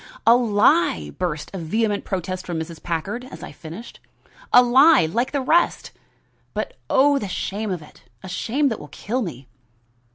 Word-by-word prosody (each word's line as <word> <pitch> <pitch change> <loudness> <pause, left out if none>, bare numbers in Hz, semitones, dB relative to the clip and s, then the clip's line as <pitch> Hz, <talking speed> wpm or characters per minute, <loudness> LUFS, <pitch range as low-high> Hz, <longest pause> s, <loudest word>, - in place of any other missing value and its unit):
"A 235 - +7
lie!" 205 - +2
burst 155 -4 -3
in 185 -3 -5
vehement 210 +4 -1
protest 185 -1 -4
from 170 -2 -2
Mrs. 160 0 -7
Packard, 185 +8 -3
as 260 - -11
I - - -8
finished. 170 +9 -10 0.5
"A 245 - +8
lie 265 - +6
like 230 +11 -1
the 280 - -1
rest! 335 +6 +1 0.6
But - - -3 0.2
oh, 285 +1 +4
the 205 - -4
shame 205 +3 -3
of 180 -5 -3
it! 150 - -17 0.2
a - - -7
shame 265 +10 0
that 225 - -4
will 150 - -10
kill 225 - -3
me." 140 - -6
205 Hz, 170 wpm, -22 LUFS, 165-245 Hz, 0.6 s, A